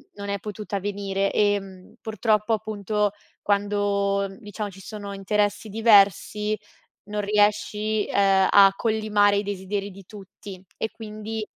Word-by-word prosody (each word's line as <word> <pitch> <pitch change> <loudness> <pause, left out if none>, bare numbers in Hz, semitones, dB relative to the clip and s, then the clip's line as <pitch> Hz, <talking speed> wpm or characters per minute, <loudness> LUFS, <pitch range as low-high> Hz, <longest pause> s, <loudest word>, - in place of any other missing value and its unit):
non 200 0 -7
è 200 0 -2
potuta 210 0 -5
venire 195 0 -2
e 195 -3 -1
purtroppo 220 0 0
appunto 210 -1 -1 0.3
quando, 200 -1 0
diciamo, 205 0 -5
ci 195 0 -13
sono 205 0 -7
interessi 205 +2 -1
diversi 210 0 +3 0.5
non 210 0 -2
riesci, 210 +1 +1
uhm, 195 -1 +3
a 200 -1 +8
collimare 215 -2 +2
i - - 0
desideri 200 0 -4
di 195 0 -13
tutti 195 -1 -11
e 220 - -3
quindi, 215 0 -6
205 Hz, 125 wpm, -24 LUFS, 200-210 Hz, 0.5 s, a